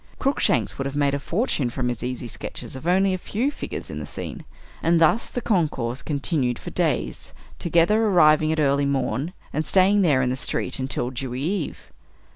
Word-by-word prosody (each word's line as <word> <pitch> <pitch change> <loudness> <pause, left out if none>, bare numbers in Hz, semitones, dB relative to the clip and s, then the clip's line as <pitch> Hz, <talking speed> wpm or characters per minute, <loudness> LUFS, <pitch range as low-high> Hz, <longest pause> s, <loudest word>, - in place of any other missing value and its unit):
Cruikshanks 135 - +1
would 135 - -1
have 140 - -6
made 145 -1 +2
a 140 - 0
fortune 165 - 0
from 125 +1 -2
his 120 -3 -3
easy 125 0 -4
sketches 120 - -7
of 130 +5 -7
only 190 +2 +3
a 185 - -2
few 240 +10 -1
figures - - -6
in - - -5
the - - -5
scene. - - -6 0.4
And 165 0 +3
thus 165 +8 +3
the 245 - -4
concourse 140 - 0
continued 140 -4 -1
for - - -8
days - - -1 0.2
together, 170 +6 +3
arriving 155 -5 +5
at 160 - 0
early 140 -1 +2
morn 140 +3 -1 0.2
and 155 - 0
staying 195 +4 +4
there 145 -8 +3
in 125 - +1
the - - -1
street 130 - -2
until 130 -1 -1
"dewy 130 0 -4
eve." 180 0 -3
150 Hz, 190 wpm, -24 LUFS, 130-180 Hz, 0.4 s, arriving